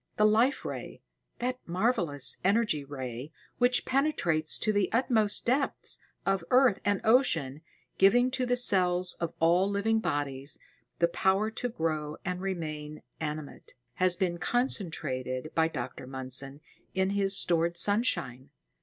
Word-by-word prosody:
"The 210 - +4
Life 230 +6 +2
Ray, - - -6 0.4
that 250 +1 -3
marvelous 170 - +1
energy 200 -6 +1
ray 130 0 -7 0.3
which 245 0 +3
penetrates 175 - +2
to 215 - 0
the 205 -3 +1
utmost 225 -4 +1
depths 270 +3 -1 0.3
of 195 -2 0
earth 250 -5 +4
and 205 -1 0
ocean, 165 - +2 0.4
giving 245 +6 +5
to 255 -1 -1
the 245 - +2
cells 185 -6 +3
of 170 -1 -4
all 175 +4 +3
living 210 +3 +1
bodies 140 -6 -3 0.4
the 170 - +3
power 195 +5 +1
to 245 +2 -3
grow 155 -6 -3
and 180 0 -3
remain 155 -5 -5 0.2
animate, 150 -2 -6 0.2
has 185 +3 +3
been 175 -2 -1
concentrated 155 - -2
by 160 0 +2
Dr. 130 -4 -6
Mundson 130 +2 -3 0.3
in 190 +1 +1
his 195 -1 +1
stored 170 0 +1
sunshine. 145 - +1
180 Hz, 135 wpm, -29 LUFS, 150-220 Hz, 0.4 s, giving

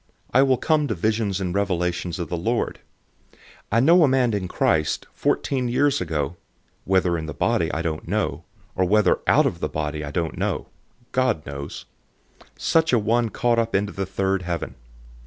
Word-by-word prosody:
For - - +3
I - - +7
will 135 -2 +4
come 155 0 +1
to 110 - -2
visions 105 +1 0
and 90 -2 -2
revelations 90 -3 -1
of 85 -3 -4
the 85 - -3
Lord. 115 +8 -1 0.5
012:002 - - -25 0.4
I 115 - +5
know 165 +6 +6
a - - +6
man 130 -3 +2
in 100 -3 -2
Christ, 75 -3 +1
fourteen 130 -3 0
years 140 +3 +2
ago 80 -1 -2 0.5
(whether 90 -3 +2
in 80 - -6
the 75 - -6
body, - - +1
I - - -2
don't 80 -2 -3
know, - - -1 0.3
or 95 - +2
whether 100 0 +3
out - - +5
of - - -1
the - - -2
body, 75 0 -3
I 75 - -5
don't 85 +2 -3
know; - - -2 0.4
God 125 - +1
knows), 70 0 -7 0.7
such 165 0 +2
a 125 - +4
one 115 +2 +1
caught 120 +1 +1
up 115 0 -1
into 100 +1 0
the 95 -1 -3
third 95 0 0
heaven. 85 -6 -4
95 Hz, 190 wpm, -23 LUFS, 85-120 Hz, 0.7 s, I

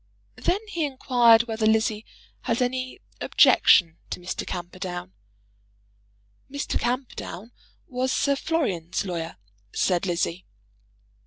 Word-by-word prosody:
Then 420 +4 0
he 340 -6 -2
inquired 245 -5 +4
whether 220 -2 -1
Lizzie 220 0 +1 0.4
had 230 -2 0
any 255 0 -2 0.2
objection 165 -3 +5
to - - -4
Mr. 180 +1 -5
Camperdown. 175 - -6 1.4
"Mr. 285 +1 -2
Camperdown 240 -4 -4 0.3
was 255 +1 -2
Sir 280 0 +2
Florian's 200 - -1
lawyer," 170 -3 -4 0.4
said 180 0 +1
Lizzie. 175 0 -2
225 Hz, 100 wpm, -25 LUFS, 180-260 Hz, 1.4 s, objection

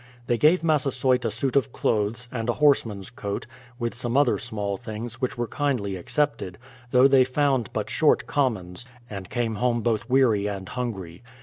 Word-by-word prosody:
They 120 -1 0
gave 160 +7 +4
Massasoyt 130 -5 +2
a - - +2
suit 135 +5 -2
of 135 -2 +2
clothes, 110 +3 -1
and 115 -2 -3
a - - +3
horseman's 115 -10 +2
coat, 100 -4 -4 0.3
with 120 -2 -2
some 120 +1 -2
other 140 -4 +3
small 105 -4 -2
things, 115 +4 -7
which 130 - -2
were 120 - 0
kindly 120 -8 -1
accepted, 95 - -2 0.3
though 125 +2 +6
they 135 -1 +6
found 130 -2 0
but - - -2
short - - +2
commons, 115 -6 -1 0.2
and 95 -3 -7
came 115 -3 -1
home 120 0 +1
both 115 0 0
weary 120 -6 +3
and 95 -2 -5
hungry. 100 -9 -5
120 Hz, 175 wpm, -25 LUFS, 105-130 Hz, 0.3 s, though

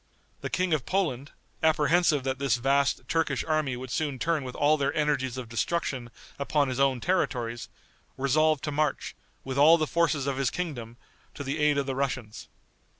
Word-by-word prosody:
The - - -5
King 185 -2 0
of 150 -5 +1
Poland, 150 -8 -1 0.3
apprehensive 160 -1 +3
that 130 0 -2
this 135 -4 +2
vast 135 +3 +1
Turkish 165 0 0
army 155 -5 0
would 130 -1 -7
soon 145 -2 -1
turn 160 +2 0
with 125 -1 -7
all 150 +1 +3
their 140 -2 0
energies 140 -4 0
of 130 -2 -5
destruction 120 +1 -2 0.3
upon 140 0 +1
his 130 0 -3
own 135 -2 +3
territories, 120 -8 -1 0.5
resolved 155 +3 +2
to 150 - -2
march, 150 0 -1 0.3
with 135 +1 -3
all 160 +4 +7
the 155 - 0
forces 155 -3 +1
of 140 -2 -1
his 135 -2 +1
kingdom, 125 -10 -5 0.4
to - - -5
the 140 +3 -3
aid 150 -1 +3
of 140 - 0
the 135 - -2
Russians. 130 -5 -3
140 Hz, 180 wpm, -27 LUFS, 130-155 Hz, 0.5 s, all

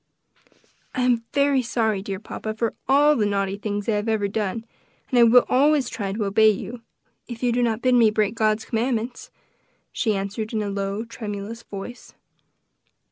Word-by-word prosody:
"I 255 - 0
am 240 -2 +2
very 280 -2 +3
sorry, 220 -4 0
dear 195 -1 -5
papa, 215 0 -6
for 225 0 -1 0.2
all 295 +2 +5
the 210 -5 +1
naughty 195 -1 -1
things 205 0 -4
I - - +2
have 210 +1 -1
ever 215 -2 +1
done, 215 +2 -3 0.5
and 250 - +4
I - - +7
will 235 +1 +6
always 280 0 +3
try 205 -4 -3
to 210 +1 -2
obey 215 +2 +5
you, 230 +3 -4 0.5
if 240 0 -8
you 245 - +2
do 245 +1 +1
not 230 -1 0
bid 255 -1 +3
me 235 -3 +6
break 210 -1 0
God's 215 -1 0
commandments," 240 0 -2 0.6
she 220 -4 0
answered 200 +3 -4
in 215 -1 0
a 200 - -3
low, 200 +2 -3
tremulous 220 -1 -6
tone. 200 +4 -7
220 Hz, 180 wpm, -23 LUFS, 205-240 Hz, 0.6 s, I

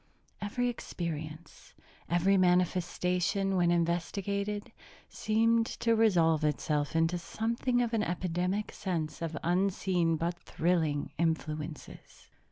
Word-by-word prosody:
Every 245 +4 -1
experience, 160 -8 -6 0.3
every 175 +4 +3
manifestation, 180 +1 +1
when 175 -2 +3
investigated, 200 +4 -1 0.4
seemed 225 +1 +2
to 230 -1 +1
resolve 170 -8 +3
itself 150 0 0
into 165 +2 +2
something 235 +7 0
of 235 -1 -3
an 225 - +2
epidemic 180 +2 -1
sense 165 -5 -3
of 165 -1 -3
unseen 180 -2 +1
but 170 +2 -2
thrilling 160 -4 0
influences. 155 -2 -4
175 Hz, 100 wpm, -30 LUFS, 165-200 Hz, 0.4 s, every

